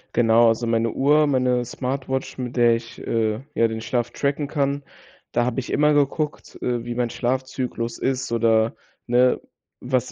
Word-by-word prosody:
Genau, 115 0 +5
also, 115 +1 0
meine 115 0 +1
Uhr, 150 +5 +3
meine 125 -3 +1
Smartwatch, 130 +2 -3
mit 125 -1 -5
der 120 -2 +5
ich, 115 +1 -8
äh, 110 0 -1
ja, 115 - +4
den 110 0 -5
Schlaf 120 +1 -1
tracken 140 +1 -1
kann, 140 -1 -1 0.5
da 120 - +2
habe 125 +1 -1
ich 130 - -5
immer 150 0 +3
geguckt, 145 +1 -1
äh, 120 -1 -1
wie 120 - -3
mein 120 0 -1
Schlafzyklus 125 -1 -2
ist 130 -2 -2
oder, 115 -1 +2 0.3
ne, 125 +1 +3 0.4
was 125 0 -1
125 Hz, 165 wpm, -23 LUFS, 115-130 Hz, 0.5 s, Genau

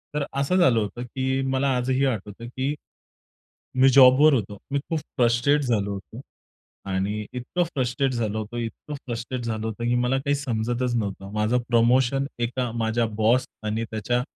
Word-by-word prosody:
तर 150 - +1 0.2
असं 140 +6 +1
झालं 130 -11 +4
होतं 110 +3 -4
की 130 +2 -1
मला 135 +1 +1
आजही 130 +2 +1
आठवतं 110 -2 -3
की 130 +4 -2 1.1
मी 135 - +7
जॉबवर 135 +3 +7
होतो. 105 -4 -2
मी 140 - +1
खूप 165 - 0
फ्रस्ट्रेट 125 +3 +2
झालो 105 -6 0
होतो 100 +5 -8 0.7
आणि 100 +3 -1
इतकं 125 +8 -2
फ्रस्ट्रेट 130 +1 0
झालो 110 -3 -1
होतो, 110 +2 -6
इतकं 120 +6 -5
फ्रस्ट्रेट 120 +1 -4
झालो 110 -1 -3
होतो 110 +2 -5
की 120 +1 +1
मला 125 +2 +1
काही 140 +1 0
समजतच 120 -2 -1
नव्हतं. 100 -2 -4
माझं 110 +3 +1
प्रमोशन 125 +3 +3
एका 120 +1 -1
माझ्या 115 +1 +1
बॉस 120 +4 +3 0.2
आणि 110 +2 -1
त्याच्या 115 +3 -1
120 Hz, 160 wpm, -24 LUFS, 110-130 Hz, 1.1 s, मी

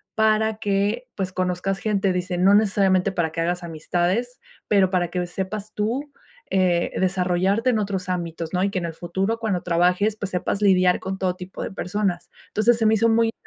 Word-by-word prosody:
para 220 0 +2
que, 205 +4 -1
pues, 185 -2 -3
conozcas 185 +1 -1
gente", 200 -3 0
dice: 180 0 -2
"No 190 +3 +5
necesariamente 195 -2 +3
para 165 -4 -1
que 165 - -2
hagas 175 +1 -1
amistades, 175 +9 -2 0.3
pero 195 -3 +4
para 175 -3 0
que 180 0 -2
sepas 200 +3 -5
tú, 250 +8 -2 0.4
eh, 180 -2 +2
desarrollarte 185 +4 +1
en 220 - +1
otros 195 -3 -3
ámbitos, 170 -1 -3
¿no? 180 - +1
Y 200 - +2
que 190 - -3
en 170 - -4
el 165 - -4
futuro 190 +7 -2
cuando 205 -6 -1
trabajes, 180 +5 +2
pues, 200 -2 -5
sepas 185 +3 -2
lidiar 185 -2 +4
con 190 0 -4
todo 185 -1 0
tipo 185 0 -8
de - - -5
personas", 190 -1 -2 0.2
entonces, 225 +2 +2
se 225 - 0
me 220 - +4
hizo 230 +2 +3
muy 225 0 +3
190 Hz, 190 wpm, -23 LUFS, 180-215 Hz, 0.4 s, No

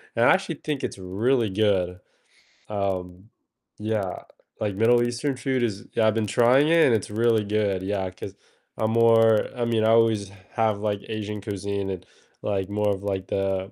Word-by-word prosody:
and 115 - +2
I - - +6
actually 185 -4 -1
think 150 -3 -3
it's - - -6
really 110 +5 0
good, 95 -3 0 0.7
um 95 -1 -3 0.5
yeah, 105 -3 -3 0.4
like, 105 -2 -1
Middle 120 +3 +4
Eastern 120 +3 -2
food 130 0 -1
is 110 0 -3
yeah, 110 - +2
I've 110 - +3
been 110 -2 0
trying 130 +7 +4
it 165 -1 +5
and 115 - +4
it's 105 - -3
really 115 0 +2
good 100 -2 -1
yeah, 95 -1 -2
'cause 95 +1 -9 0.5
I'm 110 0 +1
more 115 -1 +5
I 120 - -1
mean, 115 -2 +1
I 110 - +3
always 115 -3 +3 0.2
have, 110 -3 +1
like, 105 -1 -2
Asian 105 -1 -4
cuisine 100 -1 -4
and, 90 -1 -6 0.4
like, 95 -2 -2
more 105 0 0
of, 95 - -11
like, 95 -2 -3
the 95 0 -2
105 Hz, 180 wpm, -25 LUFS, 100-115 Hz, 0.7 s, I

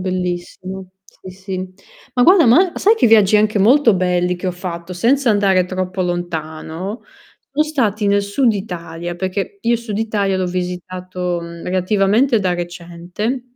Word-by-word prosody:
bellissimo, 185 +1 -4 0.2
sì, 190 -1 -13
sì. 185 0 -6 0.4
Ma 245 - +3
guarda, 355 -5 +6
ma 340 +10 +5
sai 435 +3 +4
che - - +3
viaggi 215 -2 +5
anche 210 0 +2
molto 235 +2 +5
belli 180 -1 +1
che 180 +1 -4
ho - - 0
fatto, 175 -1 -6
senza 240 +7 +2
andare 195 -3 +3
troppo 185 0 -3
lontano, 175 +3 -4 0.5
sono 295 +3 +1
stati 225 -9 0
nel 200 0 +3
sud 225 +4 +1
Italia, 175 -3 -6
perché 190 - -4
io 235 - +1
il - - -1
sud 215 -3 -5
Italia 205 -3 0
l'ho 185 -1 -1
visitato, 180 0 -4
mhmm, 170 0 -9
relativamente 205 +6 +2
da 185 -2 0
recente. 175 +7 -5
190 Hz, 155 wpm, -18 LUFS, 180-220 Hz, 0.5 s, guarda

